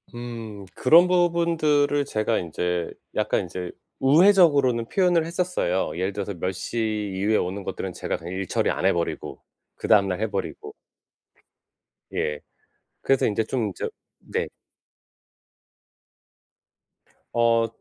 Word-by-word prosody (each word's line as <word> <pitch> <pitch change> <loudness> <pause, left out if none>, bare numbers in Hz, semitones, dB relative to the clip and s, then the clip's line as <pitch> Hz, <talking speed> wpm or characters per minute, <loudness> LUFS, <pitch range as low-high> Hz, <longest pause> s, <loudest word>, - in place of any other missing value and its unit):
음. 115 -4 -7
그런 165 +7 +6
부분들을 165 -5 +2
제가 110 -5 0
인제 90 0 -2 0.2
약간 - - +1
인제 90 0 -6 0.3
우회적으로는 145 - +5
표현을 180 -4 +2
했었어요. 170 - -1
예를 95 +2 -1
들어서 100 - -4
몇 90 +1 -2
시 105 +1 -2
이후에 105 +3 +2
오는 95 +3 -2
것들은 - - -5
제가 - - -3
그냥 85 +2 -8
일 95 0 -3
처리 - - 0
안 - - -2
해 95 - +5
버리고 85 -1 -4 0.3
그다음 100 -2 +3
날 90 0 -2
해 110 0 -1
버리고. 100 -2 -5 1.4
예. 75 -1 -1 0.6
그래서 135 -1 +2
인제 110 +1 +1
좀 110 -4 -1
저 - - -3 0.3
네. - - -3 2.9
어 115 -1 +3
115 Hz, 245 characters per minute, -24 LUFS, 95-145 Hz, 2.9 s, 그런